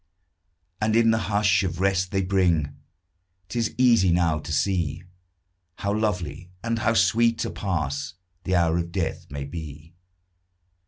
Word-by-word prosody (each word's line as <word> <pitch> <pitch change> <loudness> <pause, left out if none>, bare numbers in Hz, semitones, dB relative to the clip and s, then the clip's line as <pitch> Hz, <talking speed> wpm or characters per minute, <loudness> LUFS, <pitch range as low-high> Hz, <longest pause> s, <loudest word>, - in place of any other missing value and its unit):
And 110 +1 +1
in 115 -1 +5
the 110 0 +1
bush 105 -1 +3
of 90 -2 -3
rest 95 -1 +1
they 95 0 0
bring 85 -6 +1 0.7
'Tis 115 +1 -2
easy 115 -8 +4
now 85 -3 +2
to 75 - -7
see 85 0 0 0.7
How 100 0 -2
lovely 90 -6 -2
and 115 -1 -1
how 115 0 +1
sweet 115 +5 +3
a - - -4
pass 75 -6 -3 0.3
The 95 - 0
hour 85 -1 +2
of 85 0 -4
death 90 -3 -3
may 70 0 -5
be. 75 +1 -8
95 Hz, 145 wpm, -25 LUFS, 80-105 Hz, 0.7 s, in